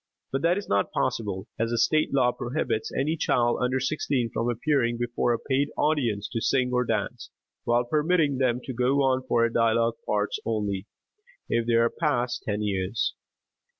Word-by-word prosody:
But 135 - -1
that 170 +3 +3
is 200 - -5
not 100 0 +1
possible, 105 -7 -2
as 115 +1 0
a 120 - 0
state 155 +7 +2
law 130 -3 +3
prohibits 120 -3 -2
any 150 +4 0
child 120 -6 +1
under 125 +1 +1
sixteen 130 -3 -1
from 115 +2 0
appearing 120 -1 +1
before 120 0 0
a 120 - +1
paid 135 +3 0
audience 120 -10 +1
to 115 - -3
sing 125 0 +1
or 125 0 +2
dance, - - -3 0.4
while 120 +1 +3
permitting 150 +1 +1
them 125 -2 +1
to 130 - -5
go 130 +4 +2
on 130 -1 +2
for 115 -2 +2
dialogue 115 0 +2
parts 105 0 0
only, 105 -3 -2 0.6
if 115 0 0
they 120 - +3
are 115 0 +3
past 125 -6 -1
ten 105 0 -1
years. 95 +1 -1
120 Hz, 175 wpm, -26 LUFS, 115-135 Hz, 0.6 s, that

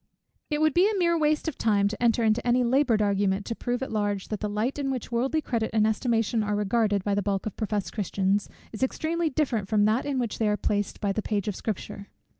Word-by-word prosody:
It 300 -1 -1
would 310 -2 +3
be 380 +5 +4
mere 340 -2 +3
waste 305 0 +1
of 315 - -4
time 205 -3 +3
to 215 +3 -5
enter 235 -1 +3
into 220 +1 +2
any 245 +1 +3
laboured 245 -3 +3
argument 200 -1 +1
to 230 - -3
prove 245 +2 -2
at - - -5
large, 205 -2 -1
that 215 - -3
the 210 - -2
light 220 +7 -1
in 275 -1 -1
which 255 -3 -4
worldly 265 +6 0
credit 225 -3 -1
and 215 -1 +3
estimation 225 0 +1
are 210 0 -1
regarded, 205 -1 +1
by 205 - 0
the 205 - +1
bulk 195 -1 -2
of 215 - -4
professed 210 -3 -2
Christians, 195 -1 0 0.2
is 215 - -8
extremely 320 +5 0
different 255 -8 -1
from 205 0 +3
that 220 +6 +1
in 280 -2 -1
which 240 -4 -2
they 220 - +2
are 210 0 +1
placed 205 -1 -2
by 200 -2 +1
the 215 - -1
page 205 -2 -2
of 205 - -2
Scripture. 200 -1 -5
220 Hz, 235 wpm, -26 LUFS, 205-255 Hz, 0.2 s, be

